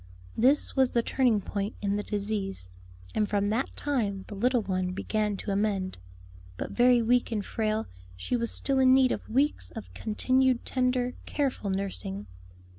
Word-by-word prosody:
This 265 +6 +3
was 265 -2 +3
the 235 - +2
turning 240 -6 +2
point 200 +2 -3
in 200 -1 0
the 205 - -1
disease, 200 - -3 0.4
and 210 -2 0
from 205 -1 +1
that 235 +5 -1
time 215 -9 -1
the - - -8
little 240 +3 +1
one 185 -2 -1
began 210 +1 -1
to 200 - -4
amend. 195 - -1 0.6
But - - -4
very 245 -1 +4
weak 245 +1 +2
and 210 -3 -2
frail, 220 -1 -1 0.3
she 90 - -2
was 235 -1 -1
still 270 -1 0
in 260 0 +6
need 260 -1 +4
of - - -4
weeks 255 - +1
of 90 +1 -9
continued 255 - +1
tender, 250 -1 0
careful 270 -8 -1
nursing. 190 - -3
215 Hz, 165 wpm, -28 LUFS, 200-250 Hz, 0.6 s, in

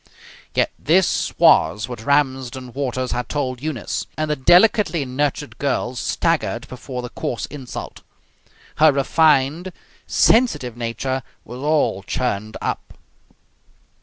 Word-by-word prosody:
Yet - - +2
this 175 +5 +2
was 95 +8 +4
what 120 -3 -7
Ramsden 130 -2 0
Waters 130 -2 -2
had 125 -1 -3
told 130 -4 -2
Eunice, 145 -7 -3
and 155 0 -1
the - - +1
delicately 175 - +4
nurtured 145 +3 -2
girl 135 -3 -1
staggered 125 - -1
before 125 0 -7
the 125 - -6
coarse 115 -2 -4
insult. 135 -4 -8 0.8
Her 155 +1 +6
refined, 150 +4 +2 0.4
sensitive 220 - +3
nature 120 +3 -3 0.2
was 125 +2 -9
all 150 -9 +1
churned 110 0 -3
up. - - -4
130 Hz, 115 wpm, -21 LUFS, 125-150 Hz, 0.8 s, Her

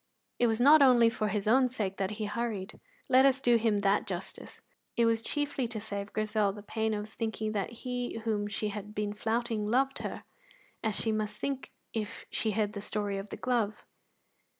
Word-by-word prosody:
It 240 - +4
was 225 0 +1
not 290 +5 +8
only 240 -4 +6
for 215 -1 -1
his 210 0 -1
own 255 +3 +5
sake 210 -6 -3
that 190 -1 0
he 215 - -2
hurried; 215 -2 -3 0.3
let 260 +1 +6
us 270 -1 +4
do 240 -3 +4
him 220 -2 +2
that 200 +2 +2
justice. 190 -1 -6 0.4
It 235 - +4
was 225 -1 +2
chiefly 285 0 -1
to 230 -2 -5
save 200 -1 -5
Grizel 215 -1 +1
the 205 0 -10
pain 220 +1 -1
of 210 0 -4
thinking 220 -1 -3
that 200 -3 -1 0.2
he 245 -2 -2
whom 210 -2 0
she 210 +1 -2
had 210 +1 -7
been 205 0 -1
flouting 225 0 -1
loved 270 +3 +2
her, - - -5 0.6
as 220 -2 0
she 220 - +1
must 215 -1 -2
think 275 -1 -3 0.2
if 220 0 -4
she 220 - 0
heard 210 0 0
the 200 - -5
story 205 -1 -2
of 195 +1 -8
the - - -6
glove. 230 -4 -1
220 Hz, 195 wpm, -30 LUFS, 210-235 Hz, 0.6 s, not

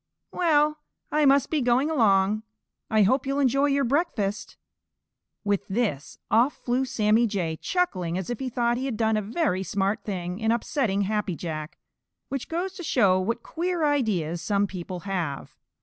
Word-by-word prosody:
Well, 305 -3 +2 0.3
I 300 0 +3
must 275 0 +4
be 310 -3 +1
going 250 +5 +2
along. 210 -6 +3 0.5
I 215 -1 +4
hope 260 +6 +2
you'll 275 +1 0
enjoy 275 +1 +3
your 280 0 +2
breakfast." 240 - -1 0.9
With 205 -2 0
this, 190 - -2
off 240 +6 +4
flew 255 +2 0
Sammy 225 -2 +2
Jay, 180 -6 -2
chuckling 185 - -1
as 190 +4 -4
if 240 - -4
he 265 - -3
thought 240 0 0
he 260 - -3
had 255 -5 -3
done 220 -1 +2
a 215 - +1
very 210 - -1
smart 200 +3 -1
thing 180 -2 -4
in 220 0 +1
upsetting 235 -3 0
Happy 210 -2 -1
Jack, 155 -2 -6 0.5
which 275 -2 -4
goes 355 +3 -2
to 370 - -8
show 200 - +3
what 230 +5 -2
queer 345 -1 -1
ideas 200 - 0
some 200 +3 +1
people 180 -2 -6
have. 175 -8 -4
225 Hz, 165 wpm, -26 LUFS, 195-275 Hz, 0.9 s, must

